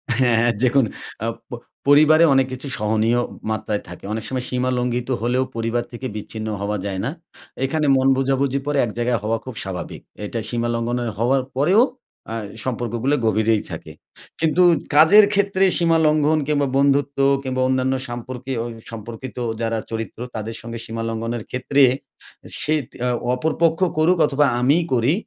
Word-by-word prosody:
হ্যাঁ, 120 -2 +3
অ্যা 120 0 +3
দেখুন 130 0 +4 0.4
আপ 115 0 -2
প - - -31 0.4
পরিবারে 155 +3 +6
অনেক 135 -1 +3
কিছু 130 +2 -6
সহনীয় 110 +3 +1 0.3
মাত্রায় 105 -1 -2
থাকে। 90 - -10
অনেক 110 0 -3
সময় 130 -1 -3
সীমা 125 0 0
লঙ্ঘিত 125 +1 -1
হলেও 125 +2 +1
পরিবার 115 +1 -1
থেকে 130 +2 -5
বিচ্ছিন্ন 110 +1 -5
হওয়া 105 +1 -1
যায় 95 -2 -3
না। 135 - 0 0.6
এখানে 155 +2 0
মন 130 - +2
বোঝাবুঝি 135 0 +1
পরে 145 0 0
এক 110 - -5
জায়গায় 120 -1 +1
হওয়া 115 +1 0
খুব 130 - -7
স্বাভাবিক। 95 -2 -6 0.2
এটা 115 +3 -4
সীমা 120 -1 -1
লঙ্ঘনের 120 0 -1
হওয়ার 130 +4 +2
পরেও 175 - +4 0.5
অ্যা 115 - -5 0.3
সম্পর্কগুলো 120 +2 -1
গভীরেই 110 0 +2
থাকে। - - -7 0.5
কিন্তু 165 +3 +3 0.3
কাজের 195 +8 +8
ক্ষেত্রে 200 -1 +2
সীমা 165 -1 +3
লঙ্ঘন 155 0 +3
কিংবা 145 -2 +1
বন্ধুত্ব 140 0 +2 0.3
কিংবা 130 -1 -2
অন্যান্য 130 0 +1
সম্পর্কে 125 +2 -6
অই 120 - -5 0.2
সম্পর্কিত 115 +3 -8 0.2
যারা 115 0 0
চরিত্র 115 0 -5 0.2
তাদের 110 +1 -4
সঙ্গে 115 0 -7
সীমা 115 0 -4
লঙ্ঘনের 115 0 -3
ক্ষেত্রে 135 +2 +2 0.8
সেইত 150 -4 0 0.2
অ - - +1 0.3
অপরপক্ষ 160 +3 +1 0.2
করুক 170 +4 +3
অথবা 145 0 +2 0.2
আমিই 150 +7 +3
করি, 125 +4 +3
125 Hz, 155 wpm, -21 LUFS, 115-140 Hz, 0.8 s, কাজের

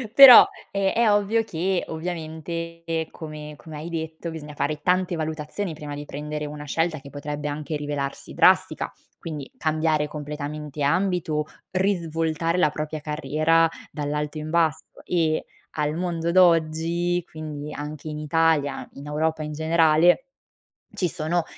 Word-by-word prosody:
Però, 270 -4 +12 0.2
è 195 -1 +1
è 230 -2 +4
ovvio 205 +2 +2
che 185 -1 -1
ovviamente 165 0 -4
come 150 -2 -8
come 160 -1 -10
hai 155 +3 -6
detto, 160 0 -5
bisogna 150 -2 -8
fare 150 +1 -2
tante 180 0 +1
valutazioni 160 +3 -3
prima 150 -1 -7
di 145 0 -7
prendere 150 +1 -5
una 150 0 -7
scelta 160 +1 0
che 140 - -11
potrebbe 145 +1 -5
anche 150 +1 -4
rivelarsi 145 -2 -4
drastica, - - +3 0.3
quindi 150 -4 -6
cambiare 155 -1 +1
completamente 150 0 -6
ambito, 165 -1 +1 0.3
risvoltare 165 -3 0
la 180 -4 +4
propria 155 +1 -4
carriera 155 +2 +2 0.2
dall'alto 150 +1 -3
in 155 0 -5
basso 160 -2 +1 0.2
e, 160 -3 0 0.3
al 150 0 0
mondo 170 -1 -1
d'oggi, 170 0 +3
quindi 150 -1 -6
anche 150 +1 -6
in 150 0 -5
Italia, 155 -1 +1
in 140 +1 -10
Europa 155 +1 -1
in 150 0 -4
generale, 160 - +4 0.7
ci 180 - 0
sono 170 +1 0
160 Hz, 135 wpm, -24 LUFS, 150-170 Hz, 0.7 s, Però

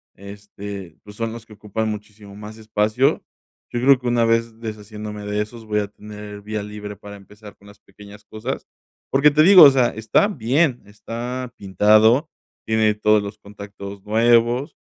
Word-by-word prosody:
este, 100 -1 -10
pues, 105 0 -13
son 115 -1 -3
los 115 -1 -10
que 110 - -22
ocupan 110 +1 -4
muchísimo 105 -1 -9
más 105 +1 -10
espacio. 110 +5 0 0.5
Yo 120 - -3
creo 135 0 +5
que 125 - -6
una 120 -1 +2
vez 115 0 0
deshaciéndome 105 -1 -7
de 105 +1 -1
esos, 110 +1 -8
voy 105 -1 0
a 100 - -5
tener 105 0 -10
vía 105 0 -5
libre 105 0 -8
para 100 0 -11
empezar 105 +1 -15
con 100 - -20
las 105 0 -16
pequeñas 105 0 -15
cosas, 110 +5 -6 0.5
porque 140 +2 +5
te 155 +2 +4
digo, 185 -1 +9
o 140 - +10
sea, 130 -3 +2
están 135 - 0
bien, 130 +3 +1
está 120 +4 -6
pintado, 110 - +3 0.4
tiene 110 -1 +2
todos 105 0 +3
los 100 +1 -7
contactos 100 -1 -10
nuevos, 120 +5 +2
110 Hz, 170 wpm, -21 LUFS, 105-120 Hz, 0.5 s, o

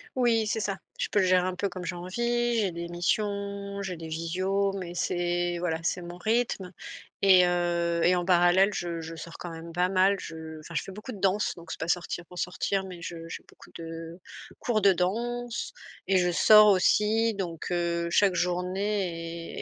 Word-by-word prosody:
Oui, 230 -3 +2
c'est 220 +1 -1
ça. 195 -2 -2 0.2
Je - - -2
peux 205 - +3
gérer 185 -1 +3
un 185 0 -2
peu 200 +2 -1
comme 180 -1 -7
j'ai 180 - -3
envie, 240 +6 -1
j'ai 200 -5 +1
des 170 0 -5
missions, 200 +2 -2
j'ai 185 -3 -4
des 160 0 -7
visios 185 +5 -1
mais 180 -3 -6
c'est 175 -1 0
voilà, 165 -2 -1
c'est 180 +1 -1
mon 175 0 -8
rythme 215 -3 -1 0.5
et 185 -2 +7
heu, 170 -1 0
et 180 +1 +5
en 175 - 0
parallèle 180 +2 +5
je 170 -2 -3
je 160 +1 -7
sors 165 +1 -9
quand 175 - -6
même 165 0 -9
pas 180 +1 +1
mal, 190 +1 +4
je 160 -2 -8
enfin, 170 - -11
je 140 - -1
fais 195 - -9
beaucoup 215 +5 -8
de 205 - -9
danse 195 +2 +1
donc 170 -1 -13
c'est - - -6
pas 165 - -3
sortir 175 0 -1
pour 180 - -9
sortir 190 +2 -1
mais 180 -2 -9
je 165 0 -7
j'ai - - -7
beaucoup - - -17
de 165 +1 -7 0.4
cours 225 -3 +1
de 200 -2 +5
danse 235 +6 -2 0.3
et 190 -1 +4
je 180 -1 +2
sors 215 +4 +7
aussi 210 +3 +3
donc 175 -5 -5
heu, 170 -1 0
chaque 195 +1 +3
journée 180 -2 -2
180 Hz, 195 wpm, -28 LUFS, 170-200 Hz, 0.5 s, et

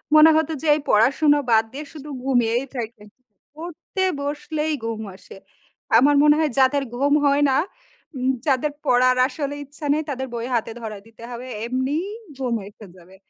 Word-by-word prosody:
মনে 310 +1 +8
হতো 320 0 0
যে, 320 - -3
এই - - -2
পড়াশোনা 280 +7 +4
বাদ 220 0 +5
দিয়ে 290 +3 -6
শুধু 300 -1 -9
ঘুমিয়েই 245 -1 +1
থাকি। 225 -3 -6 0.5
পড়তে 345 +4 -5 0.2
বসলেই 295 +2 -2
গুম 225 -1 -3
আসে। 190 - -14 0.6
আমার 285 +5 +5
মনে 295 0 +6
হয় 310 -2 +1
যাদের 270 +2 +3
গুম 280 +3 +2
হয় 285 0 +3
না, 265 - +2 0.6
উম 260 0 +1 0.2
যাদের 280 +2 +1
পড়ার 255 -1 +4
আসলে 285 +1 -4
ইচ্ছা 290 +2 -10
নেই, 310 +1 0
তাদের 265 -1 -3
বই 235 0 -3
হাতে 230 -1 -1
ধরাই 215 -3 -6
দিতে 225 0 -16
হবে। 240 +1 -7 0.2
এমনিই 260 +7 -1 0.3
ঘুম 250 -3 -1
এসে 210 +1 -14
যাবে। 180 +2 -17
265 Hz, 165 wpm, -22 LUFS, 235-295 Hz, 0.6 s, মনে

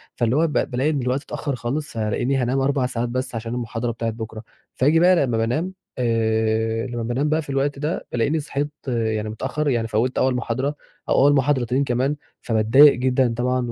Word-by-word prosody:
فاللي 120 +2 +1
هو 165 +2 +3
ب 150 - -5
بالاقي 130 +2 0
إن 145 -3 0
الوقت 125 +2 -1
اتأخَّر 140 -3 -4
خالص 125 +2 -4
ألاقيني 110 +5 0
هانام 130 +1 0
4 135 -1 +1
ساعات 120 -1 -2
بس 130 0 -3
علشان 115 +1 -4
المحاضرة 120 -1 -3
بتاعة 115 0 -3
بكرة. 110 0 -7 0.3
فييجي 150 +5 +3
بقى 180 +2 +6
لمّا 125 -8 +1
بانام 150 +12 -1 0.2
آآ، 110 -1 0
لمّا 120 -1 -4
بانام 130 +6 -1
بقى 155 +1 +1
في 150 - -12
الوقت 140 +1 -1
ده، 155 +3 -3
بالاقيني 145 +7 +1
صحيت 145 0 -3 0.2
يعني 110 -3 -1
متأخَّر، 130 +7 -2
يعني 115 -4 0
فَوِّت 115 +4 0
أول 130 -1 +2
محاضرة 130 +4 -2 0.3
أو - - +3
أول 145 - +6
محاضرتين 135 -1 +1
كمان، 130 +2 0 0.3
فباتضايق 115 +6 +6
جدًا 125 -1 +1
طبعًا 125 -1 0
125 Hz, 190 wpm, -22 LUFS, 115-140 Hz, 0.3 s, بقى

